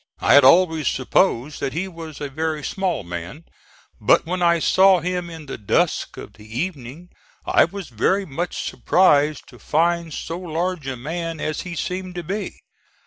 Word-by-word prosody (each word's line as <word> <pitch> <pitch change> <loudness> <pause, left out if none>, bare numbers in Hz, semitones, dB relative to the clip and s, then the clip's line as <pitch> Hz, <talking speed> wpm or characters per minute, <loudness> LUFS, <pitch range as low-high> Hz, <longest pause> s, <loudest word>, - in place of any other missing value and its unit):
I - - +3
had 140 - +8
always 160 0 +5
supposed 135 0 +1
that 135 - -3
he 175 +5 -2
was 165 -4 -9
a 145 - -3
very 155 +1 -3
small 185 - -2
man, 85 - -7 0.5
but - - +4
when 180 +2 -3
I 170 -1 +4
saw 190 +3 +5
him 180 0 -3
in 160 -2 -9
the 135 - -7
dusk 105 - 0
of - - -9
the 110 +2 -8
evening 165 -1 -5 0.4
I - - +4
was 190 -3 -8
very 190 - +1
much 170 +3 -4
surprised 150 -5 +2
to - - -15
find 170 +1 0
so 165 +3 -5
large 175 -2 -3
a 130 -1 -3
man 165 +5 -4
as 155 0 -2
he 175 -2 -7
seemed 180 +2 -4
to 175 - -4
be. 200 +6 -5
165 Hz, 175 wpm, -22 LUFS, 145-180 Hz, 0.5 s, had